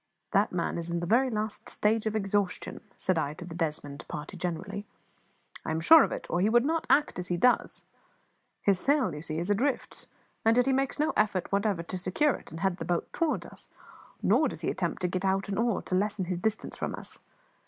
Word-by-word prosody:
"That 200 +1 +3
man 170 -1 -1
is 170 0 -5
in 170 0 -1
the 175 - -3
very 245 +8 +3
last 215 -2 -3
stage 220 +1 +1
of 215 - -1
exhaustion," 200 -2 -1 0.2
said 185 -3 +1
I 150 -1 -2
to 175 - -8
the 170 - -8
Desmond 150 -4 -3
party 150 +6 -6
generally; 185 +4 -4 0.8
"I - - -5
am 160 0 0
sure 320 - +8
of - - -1
it, - - -4
or 175 - 0
he 205 - +3
would 240 +2 +4
not 325 +2 0
act 295 -9 +3
as 180 - -5
he 175 - -1
does. 250 +8 +2 0.8
His 195 -3 +3
sail, 275 - +2
you 150 - -6
see, 155 0 -3
is 175 +5 -1
all 205 - +3
adrift; 270 +3 -2 0.4
yet 230 +2 +4
he 270 - +2
makes 270 0 0
no 305 +1 +1
effort 210 -4 +1
whatever 200 -3 +1
to 185 - -5
secure 245 +11 +2
it - - -9
and 165 +2 -8
head 190 -2 +1
the - - -5
boat 175 -2 -2
toward 330 -2 0
us, - - -10 0.5
nor - - +4
does - - -6
he - - 0
attempt - - -3
to - - +3
get 185 +1 -2
out 195 0 +1
an 200 - -1
oar 230 -3 +1
to - - -6
lessen 200 0 0
his 175 0 -2
distance 220 +3 -2
from - - -3
us. - - -10
195 Hz, 225 wpm, -29 LUFS, 175-225 Hz, 0.8 s, sure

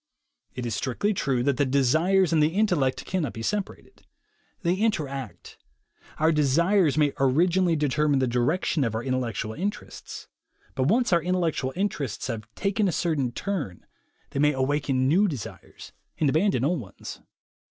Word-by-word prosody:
It 125 - -4
is 115 - -2
strictly 140 - -1
true 135 -9 0
that 140 -1 +1
the - - +3
desires 155 +8 +2
and 160 - +4
the 155 +3 +2
intellect 175 -11 +1
cannot 170 -9 -2
be 115 - -7
separated. 205 - -4 0.6
They 170 0 +2
interact. 140 - -3 0.6
Our 160 +1 +3
desires 160 +3 +3
may 150 -2 +3
orig 140 +7 +3
inally 180 -2 +2
determine 150 0 +1
the 130 - +2
direction 130 +6 0
of 115 -3 -1
our 115 - -2
intellectual 120 -4 -2
interests, 200 - -6 0.5
but 130 -1 0
once 230 +2 +2
our 170 - +4
intellectual 165 -6 -1
interests 150 - -2
have 115 -3 -5
taken 200 +1 0
a - - +1
certain 150 -7 0
turn, 150 - -4 0.5
they - - -3
may 150 +1 +4
awaken 135 -1 0
new 190 +9 +4
desires, 140 - -8 0.3
and 155 - +2
abandon 160 - +2
old 170 +2 +1
ones. 95 - -10
150 Hz, 155 wpm, -26 LUFS, 130-180 Hz, 0.6 s, and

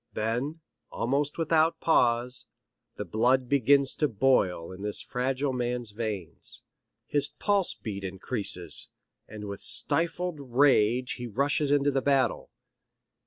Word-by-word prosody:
Then, 125 +9 -2 0.3
almost 140 +5 -1
without 165 0 +2
pause, 125 -4 +1 0.5
the 105 - -5
blood 125 +7 +1
begins 140 +1 +3
to 150 - +2
boil 100 - +1
in 95 +1 -10
this 105 0 0
fragile 130 +2 -1
man's 120 -2 -2
veins. 105 -5 -6 0.4
His 145 -1 +1
pulse 200 -3 0
beat 100 -4 -6
increases, 95 - -1 0.4
and 105 -1 -8
with 100 -1 -7
stifled 170 0 +1
rage 125 -2 +2
he 120 - -4
rushes 140 +6 0
into 145 0 +3
the 135 -1 0
battle. 135 -4 +1
125 Hz, 120 wpm, -28 LUFS, 110-145 Hz, 0.5 s, begins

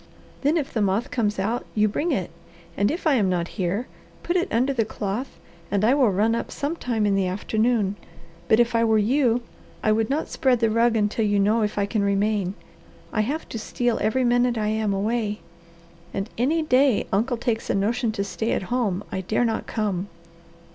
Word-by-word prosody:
"Then 295 +4 +2
if 290 -4 -3
the 220 - 0
moth 205 +7 0
comes 215 -6 0
out 220 +5 -1
you 215 0 +4
bring 300 +11 -1
it, 190 - -1 0.4
and 200 +1 +2
if 335 +4 -4
I 310 - +4
am 210 -7 +2
not 175 -1 -1
here, 190 +6 0 0.4
put 345 - -1
it 365 +1 0
under 255 +4 +2
the 235 -4 +1
cloth 215 +4 -4 0.3
and 200 +1 +1
I 240 - +5
will 270 -5 +4
run 210 +4 +2
up 230 - -2
some 290 +4 -3
time 230 -8 -1
in 205 - +2
the 195 -1 +1
afternoon. 215 +2 0 0.5
But 220 - +4
if 240 0 +3
I 230 0 +3
were 220 -1 +3
you, 240 +2 +2 0.4
I 215 - +3
would 220 0 +1
not 290 +3 -1
spread 255 -3 +1
the 225 -1 +2
rug 230 +1 +3
until 210 +1 +1
you 205 0 +2
know 215 +3 +3
if 210 -1 -1
I 200 - +2
can 205 +1 -1
remain. 200 -1 0 0.6
I 215 - +2
have 285 +9 -3
to 225 - -5
steal 240 +2 -1
every 220 +5 +1
minute 245 0 +2
I 210 -1 0
am 215 -1 0
away, 210 +1 -1 0.7
and 195 +1 -3
any 305 +7 +1
day 265 -5 +3
uncle 235 +5 +1
takes 230 -1 -2
a - - +1
notion 225 +4 0
to 200 - -1
stay 220 +3 -2
at - - -1
home 210 -6 0
I 190 - -2
dare 215 +6 0
not 225 -1 -2
come." 200 -4 -2
220 Hz, 210 wpm, -24 LUFS, 205-245 Hz, 0.7 s, I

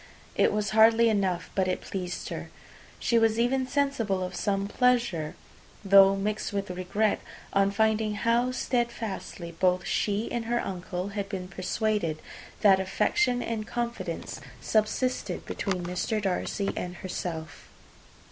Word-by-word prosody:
It - - +4
was 210 -1 -1
hardly 225 +1 +6
enough; 190 -5 0
but 190 -1 +1
it 185 - 0
pleased 180 -2 -5
her. - - -6 0.5
She 235 - +2
was 225 -1 +3
even 260 +2 +2
sensible 245 -9 0
of 180 0 -4
some 200 -1 0
pleasure, 235 -10 +1 0.5
though 195 0 +7
mixed 210 +2 -2
with 200 -2 -2
regret, 185 +4 0 0.3
on 195 0 +4
finding 220 0 +1
how 235 +3 +2
steadfastly 235 -8 -3
both 180 +2 +1
she 210 +2 0
and 235 -2 -2
her 240 +1 +1
uncle 180 -1 -4
had 200 -1 -4
been 185 -2 -4
persuaded 185 -3 -1 0.4
that 195 -2 +6
affection 245 - +1
and 220 -2 -3
confidence 240 0 -4 0.2
subsisted 225 +4 0
between 185 -3 -2
Mr. 180 +5 -1
Darcy 195 0 -1
and 180 0 -4
herself. 165 -4 -5
205 Hz, 135 wpm, -28 LUFS, 185-230 Hz, 0.5 s, though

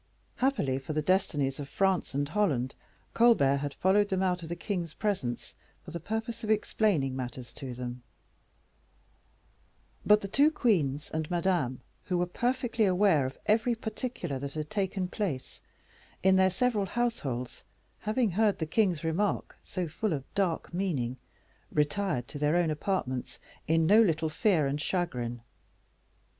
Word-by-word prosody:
Happily 195 - +1
for 135 +3 -5
the 155 0 0
destinies 150 -7 +1
of 140 -1 -6
France 190 -4 +1
and 145 0 0
Holland, 145 -9 0 0.4
Colbert 220 - +5
had 145 0 -4
followed 200 +2 +3
them 190 0 +1
out 180 -1 +1
of 165 - -8
the 170 - -2
king's 175 -2 -3
presence 185 - -2 0.3
for 170 - -8
the 170 - -4
purpose 220 +6 -4
of 215 - -4
explaining 205 -10 +1
matters 125 -1 -6
to 130 -3 -6
them; 125 0 -6 2.0
but 210 0 +5
the 195 - -4
two 280 +9 +4
queens 160 - +1
and 160 -1 -2
Madame, 170 -8 0 0.2
who 180 - 0
were 175 - +2
perfectly 240 +4 0
aware 180 -7 +3
of 130 - -8
every 230 +3 +3
particular 220 - -4
that 140 +1 -6
had 155 -1 -4
taken 190 -2 -1
place 180 - -4 0.6
in 190 0 +5
their 190 0 +5
several 210 0 +1
households, 150 - -2 0.4
having 215 0 +1
heard 210 +2 +2
the 160 - -2
king's 180 -1 +1
remark, 175 +6 -1
so 185 -2 -3
full 200 +5 -1
of 140 -3 -3
dark 185 -5 -1
meaning, 145 -10 -1 0.5
retired 150 - 0
to 145 - -7
their 150 +2 +2
own 175 -2 +2
apartments 150 -6 -2 0.3
in 165 0 +3
no 210 +7 +7
little 160 -6 +2
fear 170 -2 +2
and 140 +2 -1
chagrin. 125 -10 -2
175 Hz, 150 wpm, -29 LUFS, 140-205 Hz, 2.0 s, no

